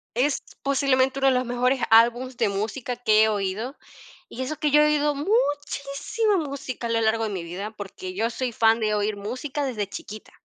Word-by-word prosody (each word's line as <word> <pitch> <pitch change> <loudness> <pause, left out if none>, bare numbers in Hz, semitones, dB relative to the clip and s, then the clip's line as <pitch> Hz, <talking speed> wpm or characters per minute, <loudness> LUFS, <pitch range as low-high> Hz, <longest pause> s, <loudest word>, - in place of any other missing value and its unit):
Es 270 +4 +1 0.2
posiblemente 270 -1 +2
uno 270 - +3
de 265 - +5
los 255 0 +1
mejores 250 +2 +1
álbums 240 +3 +4
de 235 -4 +2
música 220 +5 -3
que 220 -3 +4
he - - +4
oído, 210 +5 -2 0.5
y 255 - -7
eso 310 +4 -3
que 300 0 0
yo 300 +1 +6
he - - +5
oído 295 0 +2
muchísima 290 - 0
música 275 -6 -4
a - - -6
lo 230 0 +1
largo 225 0 +1
de 215 - -3
mi 185 -4 -4
vida, 185 +5 -6
porque 195 -3 -8
yo 220 +5 0
soy 245 +1 -3
fan 225 +1 +3
de 215 -1 +1
oír 210 0 -1
música 260 +8 -4
desde 215 -6 -2
chiquita, 215 +1 -9
245 Hz, 200 wpm, -24 LUFS, 215-275 Hz, 0.5 s, yo